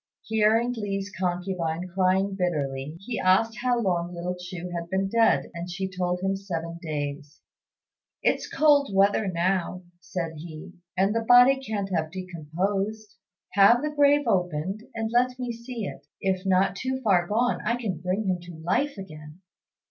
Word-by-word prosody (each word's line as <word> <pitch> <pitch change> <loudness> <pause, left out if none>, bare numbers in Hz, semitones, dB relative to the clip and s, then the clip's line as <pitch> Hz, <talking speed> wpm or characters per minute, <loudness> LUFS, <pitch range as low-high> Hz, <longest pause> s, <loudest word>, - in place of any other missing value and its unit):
Hearing 220 +2 +2
Li's 200 -3 -3
concubine 180 -2 -2
crying 190 +1 +2
bitterly, 150 -5 -2
he 230 +3 -4
asked 220 +5 +3
how 245 -1 +2
long 175 -4 -1
little 175 +1 -3
Chu 180 0 -7
had 170 -1 -4
been 190 +1 0
dead, 230 +3 +2
and 170 +1 -6
she 190 +2 -3
told 180 -1 -2
him 195 +1 0
seven 170 -4 -5
days. 145 -2 -5 0.8
"It's - - +1
cold 290 -2 +4
weather 200 +2 +3
now," 180 0 -1 0.2
said 165 -3 -5
he, 155 +2 -9 0.2
"and 195 +3 +3
the 230 - +2
body 245 +3 +6
can't 205 -5 -3
have 160 -2 0
decomposed. 190 +5 -3 0.4
Have 220 +6 +6
the 300 - -1
grave 290 0 +4
opened, 185 0 -1
and 225 0 -2
let 250 +1 +2
me 250 -1 -3
see 235 -1 -6
it; - - -8
if 190 0 -1
not 190 0 +3
too 260 +5 -2
far 180 -5 +3
gone, 240 +5 +1
I 235 +2 +1
can 195 -9 -3
bring 185 +4 -1
him 185 -2 0
to 175 -1 -10
life 205 - -1
again." 155 -3 -10
190 Hz, 160 wpm, -26 LUFS, 175-220 Hz, 0.8 s, body